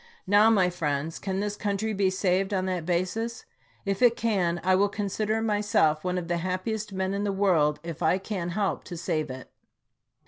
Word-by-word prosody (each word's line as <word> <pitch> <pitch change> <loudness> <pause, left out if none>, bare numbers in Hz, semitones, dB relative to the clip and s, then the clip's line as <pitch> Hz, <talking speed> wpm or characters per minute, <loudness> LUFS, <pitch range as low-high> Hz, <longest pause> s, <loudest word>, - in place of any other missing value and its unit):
Now, 205 +3 +5
my 190 -5 +3
friends, 155 -2 -2
can 195 -1 -2
this 205 0 -2
country 210 +1 -2
be 195 -2 +2
saved 190 +1 +1
on 185 -1 0
that 180 -3 -2
basis? 185 +7 -1 0.4
If 195 +1 -1
it 240 -2 +6
can, 185 -8 0
I 185 +1 +3
will 200 +2 +3
con 205 0 -3
sider 215 +2 -1
myself 205 -8 +2
one 180 0 -1
of 175 -2 -3
the 175 0 0
happiest 185 +5 -3
men 190 0 -2
in 200 +1 -1
the 205 - 0
world 175 -7 +2
if 165 -1 -7
I 165 +2 +3
can 190 -3 -4
help 195 +3 -1
to 175 - -7
save 155 -3 -2
it. 130 0 -8
190 Hz, 200 wpm, -27 LUFS, 175-205 Hz, 0.4 s, it